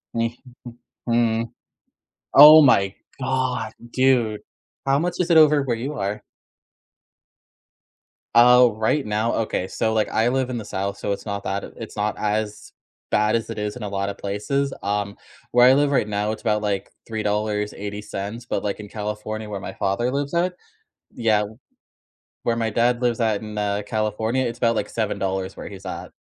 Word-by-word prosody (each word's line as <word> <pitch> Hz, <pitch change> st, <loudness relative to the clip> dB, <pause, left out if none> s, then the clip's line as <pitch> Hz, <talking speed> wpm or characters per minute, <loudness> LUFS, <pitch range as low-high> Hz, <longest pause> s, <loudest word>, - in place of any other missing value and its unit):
Nh 115 Hz, 0 st, 0 dB, 0.7 s
Mm -, -, -2 dB
Hmm, 115 Hz, -1 st, +2 dB, 0.9 s
oh, 150 Hz, +2 st, +11 dB
my 100 Hz, -8 st, +4 dB, 0.2 s
god, 130 Hz, -3 st, -1 dB, 0.2 s
dude. 125 Hz, -5 st, +2 dB, 0.4 s
How 135 Hz, 0 st, +3 dB
much 175 Hz, +3 st, -1 dB
is 180 Hz, -, 0 dB
it 165 Hz, -, +6 dB
over 150 Hz, -2 st, +6 dB
where 130 Hz, -4 st, -1 dB
you 130 Hz, +6 st, -4 dB
are? 100 Hz, +2 st, -3 dB, 2.1 s
Oh, 125 Hz, -1 st, +7 dB
right 110 Hz, +6 st, +1 dB
now? 105 Hz, +2 st, 0 dB
Okay, 110 Hz, -4 st, -1 dB
so, 110 Hz, +3 st, -1 dB
like, 110 Hz, -1 st, +1 dB
I 110 Hz, +2 st, +1 dB
live 130 Hz, 0 st, 0 dB
in 125 Hz, -, -3 dB
the 110 Hz, -, -6 dB
South, 100 Hz, 0 st, -3 dB
so 100 Hz, -, -2 dB
it's 100 Hz, -, -4 dB
not 100 Hz, -1 st, -4 dB
that 95 Hz, +1 st, -2 dB
it's 115 Hz, -1 st, -9 dB
not 105 Hz, 0 st, -1 dB
as 105 Hz, 0 st, -2 dB, 0.4 s
bad 105 Hz, +1 st, +2 dB
as 115 Hz, -, -2 dB
it -, -, -6 dB
is 105 Hz, 0 st, -3 dB
in 125 Hz, -, -9 dB
a 105 Hz, -, -4 dB
lot 100 Hz, 0 st, -2 dB
of 100 Hz, -, -7 dB
places. 135 Hz, +8 st, -1 dB
Um, 100 Hz, 0 st, -2 dB, 0.3 s
where 125 Hz, +1 st, +6 dB
I 130 Hz, -, +7 dB
live 145 Hz, +1 st, +3 dB
right 130 Hz, -6 st, +2 dB
now, 105 Hz, +1 st, -1 dB
it's 110 Hz, -, -7 dB
about, 105 Hz, -1 st, +1 dB
like, 100 Hz, -2 st, -2 dB, 0.2 s
$3.80. 105 Hz, 0 st, -3 dB
But, -, -, -2 dB
like, 100 Hz, 0 st, -2 dB
in 105 Hz, -, -8 dB
California 105 Hz, +1 st, -5 dB
where 100 Hz, -2 st, -4 dB
my -, -, -7 dB
father 110 Hz, +6 st, -1 dB
lives 140 Hz, +2 st, -2 dB
at 180 Hz, +2 st, +1 dB, 0.6 s
Yeah, 110 Hz, -3 st, +2 dB
wh 105 Hz, +2 st, -8 dB, 0.9 s
where 115 Hz, -, +2 dB
my 115 Hz, -1 st, -1 dB
dad 120 Hz, +2 st, +1 dB
lives 120 Hz, -1 st, +1 dB
at 110 Hz, -3 st, +1 dB
in, 105 Hz, -1 st, -7 dB
uh, 105 Hz, 0 st, -1 dB
California, 110 Hz, +3 st, -1 dB
it's 120 Hz, -1 st, -3 dB
about, 115 Hz, -1 st, +2 dB
like, -, -, -2 dB
$7 95 Hz, -4 st, -2 dB
where -, -, -7 dB
he's -, -, -11 dB
at. -, -, -6 dB
110 Hz, 180 wpm, -23 LUFS, 105-125 Hz, 2.1 s, oh